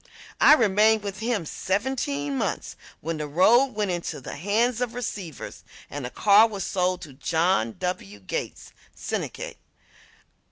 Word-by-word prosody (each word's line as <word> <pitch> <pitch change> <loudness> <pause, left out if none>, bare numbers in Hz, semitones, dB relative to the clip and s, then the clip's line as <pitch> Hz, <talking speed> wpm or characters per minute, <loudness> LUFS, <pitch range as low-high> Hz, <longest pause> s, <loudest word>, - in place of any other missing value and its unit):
I - - +8
remained 215 -2 +3
with 200 -1 -5
him 225 -6 -1
seventeen 185 - -2
months - - -2 0.3
when 165 +1 -3
the 150 -1 -4
road 230 - +4
went 210 -3 0
into 175 -4 -3
the 130 - -7
hands 220 - +1
of 240 -1 -2
receivers, 200 - -6 0.3
and 145 -1 -5
the - - -4
car 210 - +6
was 200 -4 -5
sold 180 -1 0
to 145 - -10
John 160 -4 +1
W. 140 - -4
Gates 95 - -5 0.2
syndicate. - - -4
190 Hz, 145 wpm, -25 LUFS, 155-220 Hz, 0.3 s, I